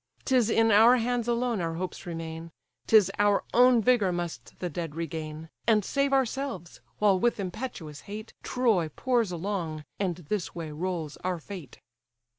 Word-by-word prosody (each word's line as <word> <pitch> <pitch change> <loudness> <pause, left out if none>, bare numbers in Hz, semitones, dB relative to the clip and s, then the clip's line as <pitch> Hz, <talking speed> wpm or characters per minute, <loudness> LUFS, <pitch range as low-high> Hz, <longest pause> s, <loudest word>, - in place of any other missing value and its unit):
'Tis 250 -4 +3
in 225 0 +4
our 225 +4 +7
hands 240 0 -1
alone 235 -3 0
our 165 -1 -2
hopes 185 +1 -5
remain, 165 -1 -6 0.4
'Tis 210 -4 +6
our 205 -1 +3
own 245 -1 +6
vigour 235 -6 +3
must 170 -9 -5
the 180 - -3
dead 165 -2 -5
regain, 160 -1 -5 0.2
And 215 -3 +4
save 275 0 +1
ourselves, 265 - -1 0.2
while 200 -3 +3
with 240 +2 +1
impetuous 185 - -5
hate 215 +2 -7
Troy 220 -10 +1
pours 235 - 0
along, 170 -4 -3
and 185 -4 0
this 175 +3 -4
way 165 -3 -5
rolls 165 -1 -3
our 180 -1 -2
fate." 165 - -10
190 Hz, 155 wpm, -28 LUFS, 165-235 Hz, 0.4 s, our